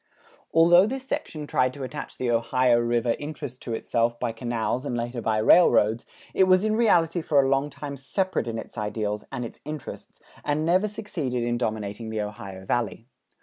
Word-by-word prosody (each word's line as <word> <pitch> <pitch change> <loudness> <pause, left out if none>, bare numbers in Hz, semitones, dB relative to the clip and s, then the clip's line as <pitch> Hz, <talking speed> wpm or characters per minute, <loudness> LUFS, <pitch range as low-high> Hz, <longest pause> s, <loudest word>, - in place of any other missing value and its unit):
Although 175 +4 +6
this 265 +2 -5
section 165 - -4
tried 130 -3 +1
to 140 - -6
attach 145 +3 -7
the 125 -2 0
Ohio 120 +1 +3
River 120 0 +1
interests 145 -4 -6
to 115 - -4
itself 115 +1 0
by 120 -2 -1
canals 120 +1 -2
and 125 -4 -2
later 120 +1 -3
by 110 0 0
railroads, 110 -3 +4 0.3
it 190 - +4
was 185 +2 +4
in 215 0 +1
reality 175 -7 +3
for 150 -2 +2
a 135 - +4
long 135 +2 +1
time 145 0 -7
separate 185 +5 -1
in 115 -1 -3
its 115 - -7
ideals 105 0 -3
and 120 - -3
its - - -10
interests 150 -2 -8 0.2
and 150 +1 0
never 185 +5 +3
succeeded 160 - -3
in 120 0 0
dominating 110 -1 -3
the 110 -1 -2
Ohio 100 -2 -7
Valley. 115 0 -1
125 Hz, 185 wpm, -25 LUFS, 115-155 Hz, 0.3 s, Although